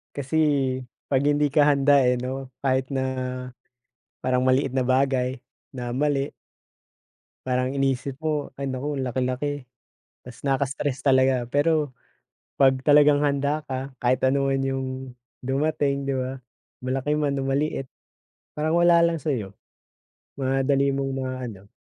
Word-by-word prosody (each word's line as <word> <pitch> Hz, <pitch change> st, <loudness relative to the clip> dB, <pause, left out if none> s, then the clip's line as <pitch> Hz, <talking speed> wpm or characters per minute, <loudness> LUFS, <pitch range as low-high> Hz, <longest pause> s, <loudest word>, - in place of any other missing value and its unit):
kasi 140 Hz, +2 st, -2 dB, 0.7 s
'pag 135 Hz, -, +4 dB
hindi 145 Hz, -1 st, +2 dB
ka 150 Hz, 0 st, +4 dB
handa, 140 Hz, 0 st, +5 dB
eh, 125 Hz, -, +3 dB
'no, 130 Hz, +2 st, -4 dB, 0.2 s
kahit 130 Hz, -1 st, +1 dB
na 135 Hz, -1 st, -1 dB, 1.2 s
parang 130 Hz, 0 st, +1 dB
maliit 130 Hz, 0 st, +2 dB
na 130 Hz, -1 st, 0 dB
bagay 130 Hz, -1 st, +1 dB, 0.3 s
na 120 Hz, -1 st, -4 dB
mali 140 Hz, +1 st, 0 dB, 1.1 s
parang 130 Hz, +1 st, 0 dB
iniisip 135 Hz, 0 st, -1 dB
mo 155 Hz, -2 st, -2 dB
ay 140 Hz, -1 st, -3 dB
naku 140 Hz, +3 st, -3 dB
ang 130 Hz, -, -2 dB
laki-laki, 130 Hz, +2 st, -2 dB, 0.6 s
tas 125 Hz, +3 st, -12 dB
nakaka-stress 135 Hz, 0 st, -1 dB
talaga. 130 Hz, -3 st, +3 dB
Pero 150 Hz, -1 st, +1 dB, 0.7 s
pag 135 Hz, -1 st, +6 dB
talagang 145 Hz, 0 st, +5 dB
handa 145 Hz, +1 st, 0 dB
ka 130 Hz, 0 st, -5 dB
kahit 125 Hz, +1 st, +3 dB
anuman 135 Hz, 0 st, +2 dB
'yung 135 Hz, 0 st, -1 dB, 0.5 s
dumating, 140 Hz, +1 st, 0 dB
di 140 Hz, -, 0 dB
ba, 130 Hz, +1 st, -4 dB, 0.4 s
malaki 130 Hz, +3 st, -1 dB
man 145 Hz, -2 st, 0 dB
o 135 Hz, -, -2 dB
maliit 135 Hz, 0 st, -1 dB, 0.7 s
parang 155 Hz, +2 st, 0 dB
wala 170 Hz, -1 st, +6 dB
lang 170 Hz, -1 st, +1 dB
sa'yo, 125 Hz, -10 st, -2 dB, 0.8 s
madali 135 Hz, +1 st, +1 dB
mong 135 Hz, 0 st, -2 dB
maano. 130 Hz, -7 st, -5 dB
135 Hz, 130 wpm, -24 LUFS, 130-145 Hz, 1.2 s, pag